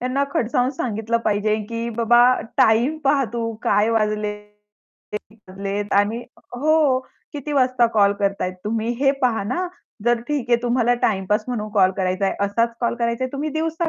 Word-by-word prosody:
त्यांना 255 +3 0
खडसावून 245 +2 +1
सांगितलं 230 -4 -2
पाहिजे, 210 0 +1
की 230 0 -3
बाबा, 235 +1 +4 0.4
टाईम 240 +8 +3
पहा 275 0 +3
तू 230 -1 -2
काय 210 +2 +2
वाजले? 215 -1 0 0.8
कीती 210 0 -7
वाजले? 195 +2 -3
आणि 210 +4 +1 0.3
हो, 300 -1 +3 0.3
किती 295 0 -5
वाजता 255 -3 +3
कॉल 200 -2 +5
करत 200 -1 0
आहे 185 - -1
तुम्ही, 220 +1 -1
हे 275 -1 +5
पहा 235 -4 +2
ना. 350 - -2 0.4
जर 240 -1 +2
ठीक 285 -5 -1
आहे 240 - +6
तुम्हाला 245 0 +2
टाईमपास 210 +1 +1
म्हणून 220 -4 -3
कॉल 190 -3 +4
करायचा 185 0 0
आहे, - - 0
असाच 230 +4 0
कॉल 235 -1 0
करायचा 235 +1 -1
आहे 255 - -5
तुम्ही 285 +2 -2
दिवसा 325 +2 -1
235 Hz, 170 wpm, -21 LUFS, 210-255 Hz, 0.8 s, आहे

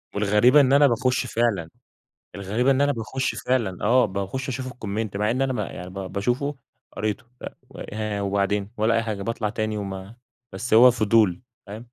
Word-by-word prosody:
والغريبة 105 +7 +5
إن 135 0 +3
أنا 145 0 +6
باخش 125 +1 0
فعلًا 110 -8 -1 0.7
الغريبة 105 +7 0
إن 135 +1 +2
أنا 145 0 +3
باخش 130 +2 -3
فعلًا، 115 -8 -1
آه، 125 +4 +4
باخش 100 +8 -4
أشوف 130 0 -4
الComment 110 -4 -4
مع 105 +2 +1
إن 130 +3 0
أنا 135 -1 0
ما 110 -4 -2
يعني 90 +1 -8
ب - - -14
باشوفه 120 +9 -2 0.4
قريته، 110 +1 -3 0.2
أ - - -4 0.2
و - - -13
ها، 105 -1 -3
وبعدين 100 +1 -1
ولا 110 +2 +2
أي 115 - +1
حاجة، 105 -3 -4
باطلع 115 0 -2
تاني 110 0 -3
وما 100 +2 -6 0.4
بس 110 +4 -2
هو 125 +3 +8
فضول، 110 -4 +2 0.2
فاهم؟ 110 +4 -8
110 Hz, 180 wpm, -24 LUFS, 100-125 Hz, 0.7 s, هو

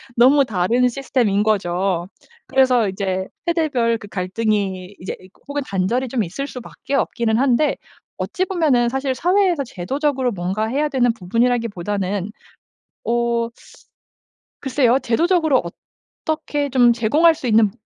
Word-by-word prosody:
너무 270 +4 +5
다른 230 +4 +1
시스템인 240 -6 0
거죠. 185 -4 0 0.4
그래서 255 -4 +3
이제 190 -1 -2 0.2
세대별 285 -9 +1
그 210 - -11
갈등이 195 -1 -2
이제 185 - -5 0.3
혹은 285 0 -3
단절이 200 +7 -1
좀 240 -2 -1
있을 195 +10 -5
수밖에 255 0 -8
없기는 235 -4 +1
한데 275 +2 +2 0.4
어찌 370 - -2
보면은 300 -11 +2
사실 265 +1 -2
사회에서 360 0 +2
제도적으로 260 - -1
뭔가 190 +4 -2
해야 285 +6 0
되는 245 -4 +2
부분이라기보다는 205 -3 -1 0.8
어 235 0 0 1.1
글쎄요. 260 -2 +2
제도적으로 315 +3 +2 0.6
어떻게 295 -2 -2
좀 245 -2 +5
제공할 265 +9 +4
수 270 - -5
있는 215 -2 +4
240 Hz, 300 characters per minute, -20 LUFS, 205-275 Hz, 1.1 s, 너무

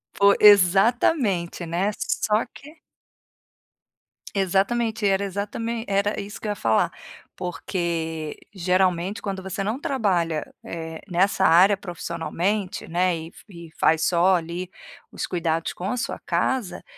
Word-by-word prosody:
Fo 200 0 +5
exatamente, 200 - +4
né, 180 +5 0
só 215 +2 0
que 300 +3 -14 1.6
Exatamente, 210 +4 +1
era 195 0 +2
exatamen 225 +4 -3
era 200 +1 0
isso 205 +1 -7
que 215 - -6
eu - - -1
ia - - -3
falar, 110 - +1 0.4
porque 165 -3 -3 0.2
geralmente 185 +1 +1
quando 195 -2 -4
você 190 +1 -4
não 220 +7 -2
trabalha, 180 - -1
eh, 160 -1 -6
nessa 190 +2 +2
área 185 +4 +6
profissionalmente, 180 +2 -3
né, 180 +1 +1
e 160 +1 -8 0.2
e 170 -3 -11
faz 160 0 +3
só 180 +3 +4
ali 175 +2 -4 0.4
os - - -4
cuidados 165 -2 -1
com 185 +3 -4
a 250 - -2
sua - - -3
casa, 255 -8 -1
190 Hz, 125 wpm, -24 LUFS, 170-205 Hz, 1.6 s, área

